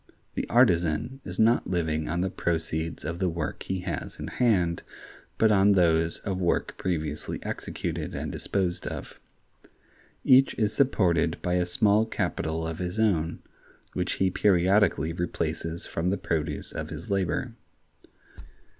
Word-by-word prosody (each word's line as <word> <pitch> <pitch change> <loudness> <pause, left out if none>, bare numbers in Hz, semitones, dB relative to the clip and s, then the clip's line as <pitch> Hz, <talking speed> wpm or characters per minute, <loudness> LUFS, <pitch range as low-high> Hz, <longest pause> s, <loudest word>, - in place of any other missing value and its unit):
The - - -3
artisan 110 - +2
is 90 0 -6
not 115 +2 +3
living 80 -3 -1
on 85 +2 0
the 95 - -1
proceeds 80 -2 -2
of 85 +2 -4
the 95 - +1
work 80 -1 -4
he 95 -1 -3
has 85 -4 -5
in - - -4
hand, 90 -9 +2 0.6
but 110 -1 +4
on 100 0 +5
those 85 -3 +3
of 95 -2 -3
work 85 -2 0
previously 80 -5 -3
executed - - -4
and - - -3
disposed 90 -3 -2
of. - - -7 1.0
Each 130 +1 +5
is 105 -2 0
supported 85 - +2
by 90 - 0
a 90 -1 +1
small 105 +4 +3
capital 80 -6 -2
of 80 0 -5
his 90 +2 -3
own, 85 -7 +1 0.5
which 90 -1 -1
he 95 -1 +1
periodically 90 -4 +3
replaces 85 -1 -3
from 85 +2 -2
the 100 - 0
produce 80 -3 -2
of - - -5
his - - -7
labor. 95 -3 0
90 Hz, 145 wpm, -27 LUFS, 80-100 Hz, 1.0 s, on